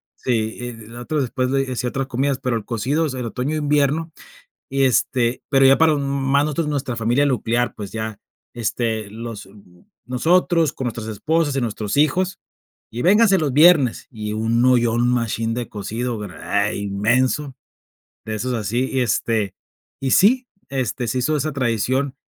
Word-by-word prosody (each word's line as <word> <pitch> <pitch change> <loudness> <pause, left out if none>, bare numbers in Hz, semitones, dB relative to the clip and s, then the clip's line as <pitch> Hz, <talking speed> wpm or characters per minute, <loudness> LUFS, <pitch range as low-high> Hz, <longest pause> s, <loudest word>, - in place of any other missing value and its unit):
sí, 120 0 -2
nosotros 120 +6 -3
después 125 +1 -1
de 135 -1 0
hacía 125 0 -2
otras 135 +2 -2
comidas, 135 +1 -1
pero 125 -2 -1
el 105 - -7
cocido 135 +9 0
es 130 - -5
el 125 -2 -4
otoño, 125 +6 -2
invierno, 150 +2 +1 0.6
y 135 0 0
este, 125 -1 +1
pero 135 -1 +4
ya 135 0 +6
para 160 -1 +5
más 140 0 +1
nosotros, 155 +1 -1
nuestra 135 -4 -2
familia 120 +5 +1
nuclear, 120 -3 0
pues 100 -2 -7
ya, 110 -2 -5 0.3
este, 110 -2 -2
los 115 -3 -7 0.6
nosotros 165 +5 +2
con 130 - -5
nuestros 115 -1 -4
esposas 145 +7 0
y 135 - 0
nuestros 105 0 -3
hijos, 180 +5 +2 0.6
y 120 - -3
vénganse 200 +1 +5
los 150 -5 -1
viernes, 150 -4 +5
y 105 -2 -5
un 115 +2 +1
ollón 120 -2 +3
un 120 0 +2
machín 115 -1 -1
de 120 0 -3
cocido, 110 +2 -4
eh, 100 0 -2
inmenso, 120 +8 0 0.7
de 110 - -4
esos 125 +4 -2
así 115 +4 -1
y 130 - 0
este 110 -3 0 0.5
y 135 -1 0
sí, 250 +6 +4 0.2
este 130 -2 -2
se 130 - -1
hizo 150 +5 +1
esa 150 +2 -1
tradición 130 +1 0
125 Hz, 160 wpm, -21 LUFS, 115-140 Hz, 0.7 s, ya